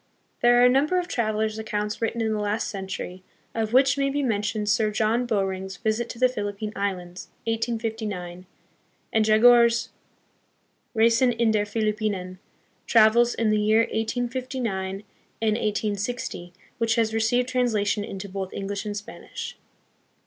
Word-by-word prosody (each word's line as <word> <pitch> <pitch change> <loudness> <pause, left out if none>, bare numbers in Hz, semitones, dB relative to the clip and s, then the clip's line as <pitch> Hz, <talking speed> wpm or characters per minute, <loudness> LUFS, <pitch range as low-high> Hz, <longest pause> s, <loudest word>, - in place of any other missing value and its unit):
There 240 0 +5
are 245 - +7
a - - +8
number 280 +8 +3
of 355 -1 -1
travellers' 220 -4 -1
accounts 210 -1 -3
written 230 +1 -1
in 220 -1 0
the 215 - -1
last 210 +2 -1
century, 190 -2 -6 0.3
of 220 -1 -2
which 265 +3 +4
may 275 0 +2
be 285 +1 -1
mentioned 210 -2 -1
Sir 215 +1 +2
John 225 +3 +1
Bowring's 190 -3 -2
Visit 220 +3 -1
to - - -7
the 255 +1 +5
Philippine 210 -3 -4
Islands, 185 -3 -4 0.2
1859, 220 -6 -3 0.7
and 220 - +4
Jagor's 235 +1 +5 1.1
Reisen 230 +3 +4
in 230 -1 +2
der 210 -1 +1
Philippinen, 210 -4 -2 0.5
travels 235 +1 +5
in 225 -2 +1
the 215 0 +2
year 215 +2 +4
1859 230 -4 -2 0.4
and 220 -1 +1
1860, 210 -3 -2 0.3
which 225 -1 +2
has 225 -2 +1
received 225 +3 +1
translation 220 -5 +1
into 195 -1 -6
both 190 -1 -5
English 200 +2 -4
and 205 0 -3
Spanish. 205 - -8
220 Hz, 140 wpm, -25 LUFS, 205-235 Hz, 1.1 s, a